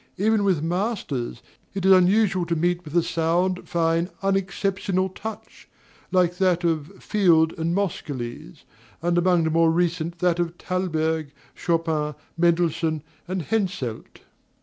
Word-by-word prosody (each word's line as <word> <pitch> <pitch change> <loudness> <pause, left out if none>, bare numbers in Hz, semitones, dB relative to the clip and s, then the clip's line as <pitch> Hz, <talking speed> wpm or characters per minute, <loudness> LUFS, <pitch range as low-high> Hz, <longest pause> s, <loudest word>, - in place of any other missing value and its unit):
Even 215 +2 +2
with 185 -6 +2
masters, 170 - -2 0.3
it 195 -1 -2
is 190 - +6
unusual 190 0 +4
to 170 - 0
meet 175 +2 0
with 155 +1 -3
a 170 - +4
sound, 175 +3 0
fine, 165 +1 +1
unexceptionable 195 -1 0
touch, 220 +3 -9 0.4
like 180 -1 +2
that 180 -2 +2
of 165 +2 -2
Field 165 -6 +3
and 165 +2 0
Moscheles, 135 - -4 0.4
and 175 0 +1
among 175 -1 +3
the 160 - 0
more 165 +1 +4
recent 170 0 0
that 175 -1 +1
of 170 -1 -1
Thalberg, 160 -5 -1 0.2
Chopin, 160 -3 -1 0.2
Mendelssohn, 165 -2 +1 0.2
and 185 -1 -2
Henselt. 185 - -3
175 Hz, 130 wpm, -24 LUFS, 160-185 Hz, 0.4 s, is